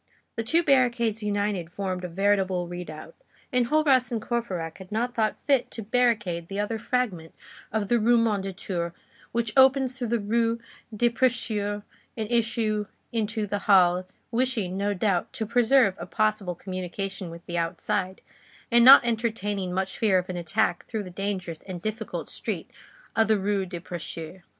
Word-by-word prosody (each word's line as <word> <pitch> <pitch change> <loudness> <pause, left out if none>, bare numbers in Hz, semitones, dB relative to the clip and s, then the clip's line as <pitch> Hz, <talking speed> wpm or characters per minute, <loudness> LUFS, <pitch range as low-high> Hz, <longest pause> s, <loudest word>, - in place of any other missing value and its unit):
The - - -1
two 325 +10 +2
barricades 240 -6 +2
united 205 -4 -1
formed 185 -1 -3
a - - -2
veritable 190 -1 +1
redoubt. 170 -3 -8 0.4
Enjolras 260 +1 +3
and 230 - -1
Courfeyrac 195 -8 -3
had 190 0 -11
not 240 +3 -1
thought 220 -2 0
fit 275 -4 +2
to 225 - -7
barricade 210 -7 +1
the 195 +2 -4
other 220 +2 -1
fragment 210 -10 -2 0.4
of 215 -2 -1
the 240 +3 +3
Rue 235 +2 +4
Mondétour 195 -5 -1 0.4
which 230 -2 -1
opens 265 -1 +5
through 245 - -1
the 235 +1 +1
Rue 230 +2 +1 0.3
des 235 +2 +2
Prêcheurs 215 -4 0 0.3
an 220 - -1
issue 220 -3 +1 0.2
into 220 -1 -1
the 205 0 -2
Halles, 180 -2 +5 0.3
wishing, 230 -6 0
no 200 +1 0
doubt, 185 -2 0
to 220 - -3
preserve 245 -1 +4
a 175 - -6
possible 215 -3 0
communication 185 +1 -5
with 170 0 -11
the 175 0 -2
outside, 180 +2 -2 0.5
and 235 0 +6
not 260 0 +10
entertaining 215 -5 -1
much 190 +1 -2
fear 205 -4 +4
of 185 0 -2
an - - -5
attack 175 0 0
through 220 -2 -3
the 185 - -9
dangerous 185 -4 -3
and 185 -2 -5
difficult 215 +4 -4
street - - -5 0.4
of 225 -1 +3
the 220 -1 +4
Rue 195 -1 0
des 175 -1 -6
Prêcheurs. 175 0 -7
205 Hz, 160 wpm, -26 LUFS, 185-230 Hz, 0.5 s, not